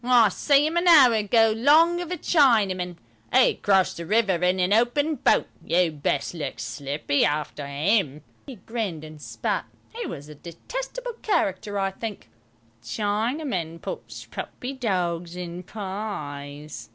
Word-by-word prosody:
"I 240 -3 +5
see 285 +8 +3
'im 320 +2 -1
a 345 - +2
hour 275 -8 +8
ago 220 +1 +3
'long 320 +8 +4
of 350 - -6
a 360 - -3
Chinaman. 205 - +2 0.4
'E - - +5
crossed 190 -4 +2
the 170 - -6
river 215 -2 +3
in 180 +2 +1
a 195 +4 +4
open 290 +6 +1
boat. - - +2 0.2
You'd 170 -4 +1
best 140 +2 -1
look 150 -5 -5
slippy 140 +4 -1
arter 150 -1 -2
'im." 150 0 0 0.2
He 270 - -8
grinned 200 -6 -4
and 155 -1 -11
spat; - - -3 0.3
he 475 -1 -4
was 145 +1 -7
a 150 - -10
detestable - - -6
character, 205 - -1
I 195 0 0
think. 210 +1 -7 0.5
"Chinamen 205 - -2
puts - - -7
puppy 255 +2 -6
dogs 180 -8 -2
in 175 0 -6
pies. 150 - -6
195 Hz, 145 wpm, -25 LUFS, 165-245 Hz, 0.5 s, hour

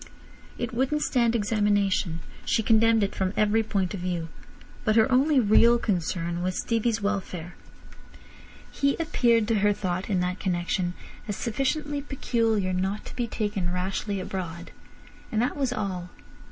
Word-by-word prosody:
It 240 +1 -3
wouldn't 265 +5 0
stand 235 -2 +2
examination. 205 -5 +1 0.2
She 225 - +1
condemned 225 0 +4
it 200 - -1
from 190 0 -1
every 215 +1 +3
point 200 -4 -1
of 200 - -4
view. 175 -2 -3 0.5
But 215 -2 +2
her 225 +3 +4
only 275 +3 +4
real 235 +1 +5
concern 175 -4 -1
was 185 +1 -1
Stevie's 230 -1 0
welfare. 185 -4 -3 1.2
He 280 0 +1
appeared 235 -9 +2
to 225 -2 +2
her 205 +1 +3
thought 185 -1 -3
in 190 -3 +1
that 180 +1 -2
connection 175 -1 -1 0.3
as 205 - -2
sufficiently 285 +6 -1
"peculiar" 225 -8 0
not 190 +3 -2
to - - -9
be 240 -2 -1
taken 205 -5 -2
rashly 190 +2 -2
abroad. 175 -2 -5 0.6
And 215 - 0
that 245 +4 +1
was 270 -3 0
all. 190 -6 -3
210 Hz, 150 wpm, -26 LUFS, 185-235 Hz, 1.2 s, real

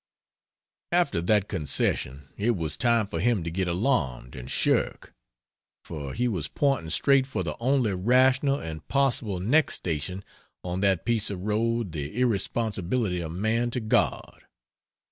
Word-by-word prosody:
After 170 - +2
that 105 +3 +2
concession, 70 -2 -1
it 115 +3 +1
was 80 -3 -2
time 115 -3 +2
for 85 -4 -4
him 110 -1 +1
to 85 - -4
get 95 +2 -1
alarmed 85 - -1
and 60 -1 -8
shirk - - 0 0.7
for 70 -4 -6
he 125 +2 +1
was 90 -11 -2
pointing 135 - 0
straight 135 +7 +3
for 135 - -2
the - - -3
only 125 -3 +1
rational 130 +7 +3
and 80 -2 -7
possible 120 -8 +1
next 135 - +2
station 85 +3 -4 0.4
on 90 +1 -3
that 95 -3 +1
piece 115 -2 +1
of 95 -3 -5
road 110 0 0
the 75 - -5
irresponsibility 110 -4 0
of 80 -1 -5
man 110 +6 0
to 120 - -2
God. 110 -2 0
105 Hz, 145 wpm, -26 LUFS, 85-120 Hz, 0.7 s, straight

